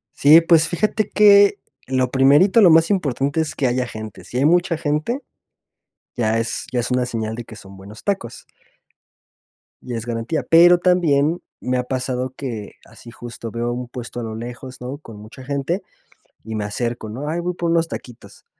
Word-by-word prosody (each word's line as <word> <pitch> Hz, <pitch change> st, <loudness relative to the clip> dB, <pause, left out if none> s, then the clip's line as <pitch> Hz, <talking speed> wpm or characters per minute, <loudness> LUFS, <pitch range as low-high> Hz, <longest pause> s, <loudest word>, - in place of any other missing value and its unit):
Sí, 155 Hz, +4 st, +7 dB
pues 165 Hz, -1 st, +3 dB
fíjate 210 Hz, +3 st, -1 dB
que 205 Hz, -1 st, +6 dB, 0.3 s
lo 130 Hz, -1 st, 0 dB
primerito, 145 Hz, -, +5 dB
lo 180 Hz, -5 st, +7 dB
más 165 Hz, +3 st, +5 dB
importante 145 Hz, -4 st, 0 dB
es 160 Hz, -, -2 dB
que 135 Hz, -, 0 dB
haya 125 Hz, 0 st, 0 dB
gente. 110 Hz, -2 st, -9 dB
Si 125 Hz, -, -8 dB
hay 135 Hz, -, +2 dB
mucha 175 Hz, +1 st, +3 dB
gente, 155 Hz, -, -2 dB, 0.9 s
ya 115 Hz, -1 st, +1 dB
es 115 Hz, 0 st, -3 dB
ya 125 Hz, -, +1 dB
es 120 Hz, -, -4 dB
una 125 Hz, 0 st, +1 dB
señal 110 Hz, -2 st, -4 dB
de 120 Hz, -, -7 dB
que 110 Hz, -, -12 dB
son 95 Hz, -1 st, -13 dB
buenos 100 Hz, +3 st, -13 dB
tacos 195 Hz, -, -3 dB, 1.4 s
Ya 120 Hz, -2 st, -5 dB
es 115 Hz, -, -5 dB
garantía. 120 Hz, +6 st, -2 dB
Pero 175 Hz, +2 st, +7 dB
también 170 Hz, -3 st, +2 dB, 0.2 s
me 125 Hz, 0 st, -1 dB
ha 125 Hz, -, -1 dB
pasado 130 Hz, 0 st, -3 dB
que, 115 Hz, -7 st, -6 dB
así 115 Hz, -, -14 dB
justo, 115 Hz, -1 st, -9 dB
veo 120 Hz, +1 st, -3 dB
un 125 Hz, 0 st, -5 dB
puesto 120 Hz, 0 st, -7 dB
a -, -, -5 dB
lo 110 Hz, -1 st, -5 dB
lejos, 125 Hz, +3 st, -8 dB
¿no? 130 Hz, +3 st, -6 dB
Con 115 Hz, -8 st, -13 dB
mucha 110 Hz, +5 st, -12 dB
gente, 140 Hz, +8 st, -2 dB, 0.6 s
y 110 Hz, 0 st, -6 dB
me 105 Hz, -1 st, -2 dB
acerco, 115 Hz, +1 st, -4 dB
¿no? 135 Hz, +7 st, -6 dB
"Ay, 165 Hz, +3 st, -2 dB
voy 180 Hz, +1 st, -2 dB
por 170 Hz, -1 st, -1 dB
unos 165 Hz, 0 st, +2 dB
taquitos". 120 Hz, -6 st, -11 dB
130 Hz, 185 wpm, -20 LUFS, 120-165 Hz, 1.4 s, Sí